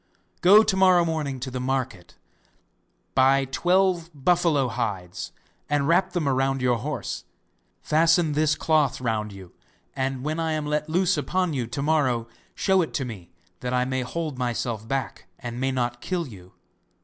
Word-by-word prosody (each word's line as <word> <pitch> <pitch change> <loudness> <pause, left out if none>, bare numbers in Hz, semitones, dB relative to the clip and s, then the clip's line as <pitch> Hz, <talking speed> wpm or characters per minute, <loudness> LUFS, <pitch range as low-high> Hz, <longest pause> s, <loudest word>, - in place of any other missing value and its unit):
Go 205 +4 +8
to 215 -3 +1
morrow 185 -2 +5
morning 150 -5 -2
to 130 0 -4
the 125 - -4
market, 125 -7 -3 1.0
buy 135 +1 +4
twelve 175 +4 +1
buffalo 155 -2 +2
hides 100 -7 -4 0.4
and 145 -1 +1
wrap 170 +3 +2
them 170 -5 -1
round 135 0 +1
your 125 -2 +1
horse; 145 +5 -4 0.6
fasten 165 +1 +3
this 155 +1 +2
cloth 155 -5 +1
round 110 -4 -2
you, 95 -3 -12 0.4
and 130 -1 -2
when 155 +2 -2
I 160 -1 0
am 155 -1 -2
let 150 +1 -1
loose 180 +3 +2
upon 185 -3 0
you 125 -4 -2
to 130 +4 -4
morrow 135 -7 +1 0.3
show 190 -1 +3
it 160 - -3
to 135 - -1
me, 100 -8 -8 0.3
that 125 0 -2
I 125 0 +2
may 130 0 -1
hold 150 +1 -4
myself 120 -2 -2
back 130 -5 -3
and 120 0 -6
may 135 +1 0
not 120 -2 -2
kill 180 -2 -2
you. 95 -8 -13
135 Hz, 165 wpm, -25 LUFS, 125-165 Hz, 1.0 s, Go